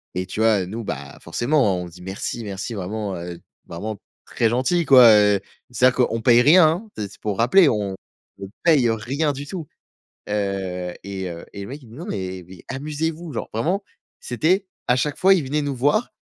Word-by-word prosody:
et 90 - -2
tu 95 - -7
vois, 110 -4 +3
nous, 110 +5 -6
bah, 70 -8 -6
forcément, 120 - +1
on - - -5
dit: 85 +1 -14
«Merci, 95 +5 -5
merci», 100 +3 -5
vraiment, 100 0 -4
heu, 85 0 -7 0.3
vraiment 105 +5 -5 0.3
très 115 - 0
gentil, 130 +9 +1
quoi, 130 -5 +8
heu, 105 -1 +4 0.3
c'est-à-dire 125 +1 +3
qu'on 115 - -3
paye 120 +1 +6
rien, 160 +5 +7
hein. 180 +8 -2
C'est 105 -2 -4
c'est - - -17
pour 105 -2 -2
rappeler, 145 +9 +5
on 100 -5 -1 0.5
on 95 - -6
paye, 150 -8 +4
heu, 115 - +2
rien 135 +8 -1
du 140 +1 -7
tout. 165 -1 -6 0.6
Heu 95 -3 -2
et 95 -1 -5
heu 85 -1 -8
et 100 - -7
le - - -8
mec 140 +4 -8
il 120 - -16
nous 115 - -13
dit: - - -11
«Non, 170 - -6
mais 95 - -5
mais 95 -1 -13
amusez 150 +4 -2
vous», 160 -1 -9
genre - - -4
vraiment, 175 - 0 0.4
c'était 190 - +1 0.2
à 125 - +4
chaque 145 +3 -1
fois, 190 +1 +5
il 170 - 0
venait 150 +3 -1
nous 140 -2 -2
voir 145 - +1
115 Hz, 210 wpm, -22 LUFS, 100-150 Hz, 0.6 s, quoi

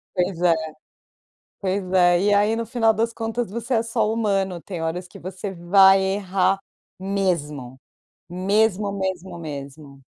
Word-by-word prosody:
Pois 180 -1 -1
é. 175 -2 +5 1.1
Pois 190 -1 -2
é, 175 -1 +4
e 205 +1 +3
aí 205 +2 +3
no 230 0 -3
final 225 -1 +2
das 230 +2 0
contas 225 -1 -3
você 235 +4 -3
é 225 -1 +2
só 230 -1 0
humano, 195 -5 -1
tem 175 -2 -6
horas 175 +2 -3
que - - -13
você 190 +2 -6
vai 190 +2 +5
errar 190 0 +1 0.4
mesmo. 170 -10 -2 0.5
Mesmo, 200 +2 +1
mesmo, 190 -2 -4
mesmo. 140 -2 -9
190 Hz, 140 wpm, -23 LUFS, 175-210 Hz, 1.1 s, é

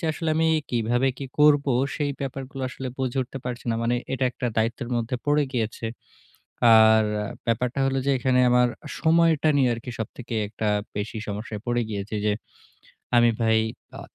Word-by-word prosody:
যে - - -5
আসলে 165 0 -3
আমি 160 0 +3 0.2
কিভাবে 120 +2 +1
কি 140 - -5
করবো 145 -2 +5 0.2
সেই 145 -2 -1
ব্যাপারগুলো 135 0 -5
আসলে 130 0 -6
বুঝে 130 0 -1
উঠতে 130 +2 -8
পারছি 125 -1 -5
না। 115 - +1
মানে 120 +1 +1 0.2
এটা 130 0 0
একটা 125 - -3
দায়িত্বের 115 +2 -1
মধ্যে 120 +2 -2
পড়ে 145 0 +3
গিয়েছে। 115 -1 -2 0.9
আর 110 0 +6 0.4
ব্যাপারটা 125 +3 0
হলো 135 0 0
যে - - +3
এখানে 125 0 +2
আমার 125 0 +4 0.3
সময়টা 160 -2 +3
নিয়ে 130 -3 +3
আরকি 120 +2 -7
সবথেকে 115 +2 -6
একটা 110 0 -3 0.3
বেশি 105 +2 -3
সমস্যায় 105 +1 -5
পড়ে 120 0 +1
গিয়েছে। 105 +1 -4
যে 105 - +3 0.8
আমি 120 0 +6
ভাই 110 0 +4 0.4
আ - - -7
125 Hz, 165 wpm, -25 LUFS, 115-135 Hz, 0.9 s, আর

